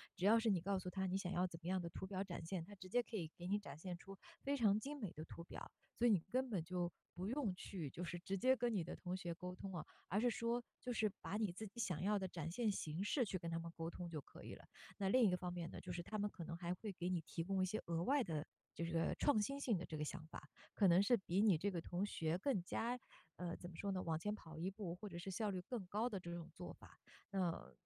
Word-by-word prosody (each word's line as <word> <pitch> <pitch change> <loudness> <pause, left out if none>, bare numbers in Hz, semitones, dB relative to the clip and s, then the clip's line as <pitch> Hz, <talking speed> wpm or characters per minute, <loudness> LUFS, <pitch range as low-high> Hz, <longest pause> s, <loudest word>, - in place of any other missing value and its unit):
只 180 - 0
要 225 +3 +8
是 225 0 +3
你 190 -4 +5
告 195 +2 +2
诉 185 - -3
它 190 +1 0
你 185 +1 +2
想 185 -2 -2
要 180 0 +3
怎 165 -2 -8
么 - - -4
样 185 0 +2
的 170 - -3
图 170 - -5
表 190 0 -1
展 180 -4 -5
现- 175 0 -1
它 205 +3 -10
直 185 -1 -9
接 245 - +4
可 235 - -7
以 165 -4 -2
给 175 - -5
你 200 +2 +3
展 205 - -8
现 175 +2 -4
出 195 +2 -9 0.3
非 280 +1 +2
常 210 -4 +5
精 285 +5 -4
美 205 -8 -2
的 155 - -5
图 170 - -7
表。 - - -7 0.3
所 240 - +4
以 - - +7
你 200 - +6
根 255 +3 +2
本 195 -7 +1
就 175 +1 0 0.2
不 180 +1 -3
用 240 -7 +1
去， 180 -4 -4
就 170 - -5
是 175 0 -3
直 190 +3 -1
接 255 +7 +6
跟 240 -1 +1
你 185 - +2
的 165 - -4
同 180 0 -2
学 175 -2 -2
沟 180 +2 -5
通 190 +1 -5
啊， 155 -3 -3 0.2
而 195 - +3
是 245 +2 +5
说， 235 +1 +1 0.2
就 250 - -2
是 220 -2 +3
把 205 - -1
你 210 -5 +1
自 215 +4 -5
己 215 +4 -11
想 180 -8 +1
要 205 +2 +3
的 190 - -1
展 165 -3 -3
现 225 +4 +2
形 165 -4 -1
式 245 +6 +3
去 195 -4 -1
跟 170 -2 -4
他 165 - 0
们 165 0 -5
沟 165 0 -1
通 175 0 -5
就 160 -2 -2
可 140 - -12
以 - - -6
了。 - - -14 0.3
那 195 - +1
另 250 +6 +6
一 200 - +7
个 180 - +3
方 180 0 -3
面 170 -2 -3
呢， - - -6
就 180 - -4
是 175 0 -2
它 215 - -3
们 205 0 +1
可 180 - -7
能 165 +1 -4
还 175 0 -1
会 205 +3 -4
给 175 -2 -3
你 180 -2 +2
提 165 +1 -3
供 190 0 +2
一 - - +5
些 200 +4 -1
额 170 0 +1
外 280 +8 +4
的 155 -2 -1 0.3
这 - - -2
个 165 0 +2
创 255 -7 +4
新 275 +6 0
性 230 -7 +3
的 175 - -3
这 155 - -4
个 150 - 0
想 155 +1 -4
法， 160 - -7 0.3
可 200 -3 +6
能 175 +2 +8
是 220 +5 +6
比 190 -3 +1
你 205 -6 +7
这 200 +6 +1
个 175 - -1
同 175 +4 0
学 165 -4 +1
更 210 -3 +2
加， 240 +6 0 0.4
呃， 175 -1 -2
怎 175 - -7
么 170 - -10
说 200 - -1
呢？ 185 - 0
往 160 -2 +1
前 210 +5 0
跑 160 -6 -10
一 175 +4 0
步， 195 -3 -4
或 210 - -6
者 180 - -6
是 180 +3 -4
效 210 +3 +1
率 185 -2 -1
更 205 0 -4
高 215 +6 +1
的 200 -5 -2
这 170 -1 -5
种 170 -1 -5
做 175 +1 -6
法， - - -15 0.3
那 175 - 0
185 Hz, 325 characters per minute, -42 LUFS, 170-210 Hz, 0.4 s, 要